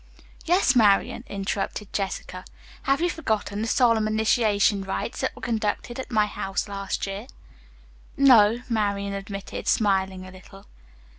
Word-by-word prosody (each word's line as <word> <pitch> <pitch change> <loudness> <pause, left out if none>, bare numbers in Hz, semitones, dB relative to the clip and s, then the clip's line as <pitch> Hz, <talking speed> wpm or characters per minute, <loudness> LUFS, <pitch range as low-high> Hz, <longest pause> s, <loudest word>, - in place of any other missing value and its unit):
"Yes, 350 -6 +3
Marian," 210 -4 +3
interrupted 200 +1 -4
Jessica, 185 -2 -4 0.5
"have 275 +3 +3
you 350 - +2
forgotten 215 -8 -2
the 225 - -2
solemn 230 -3 +3
initiation 215 -2 +2
rites 195 - -4
that - - -2
were - - -14
conducted 230 +1 -2
at 260 - -6
my 215 -3 +3
house 195 -1 -3
last 195 -1 -3
year?" 200 +4 -6 0.9
"No," 240 -4 +5
Marian 200 -3 -1
admitted, 195 0 -6
smiling 190 -3 +1
a 185 - -11
little. 195 +2 -15
205 Hz, 135 wpm, -25 LUFS, 195-230 Hz, 0.9 s, No